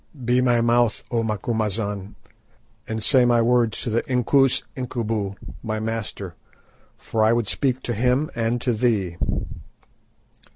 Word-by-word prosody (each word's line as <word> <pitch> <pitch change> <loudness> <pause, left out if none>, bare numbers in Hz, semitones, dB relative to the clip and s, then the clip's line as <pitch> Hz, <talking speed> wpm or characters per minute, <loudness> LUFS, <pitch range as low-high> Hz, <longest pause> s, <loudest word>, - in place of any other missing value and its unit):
Be 125 +1 +3
my 120 -2 +3
mouth, 120 -1 +2
O 115 -2 +1
Macumazahn, 105 -2 -2 0.7
and 110 -1 -4
say 130 0 +5
my 120 -1 +4
words 115 -1 +2
to 120 - -2
the 115 - +2
Inkoos 130 +1 +3
Incubu, 115 -6 -3 0.3
my 110 -1 -3
master, 110 -4 -4 0.6
for 110 -1 -1
I 110 - +4
would 120 -3 0
speak 130 +2 0
to 120 - -1
him 125 +6 +1
and 115 +1 0
to 125 - +1
thee." 105 -7 0
115 Hz, 135 wpm, -23 LUFS, 110-125 Hz, 0.7 s, say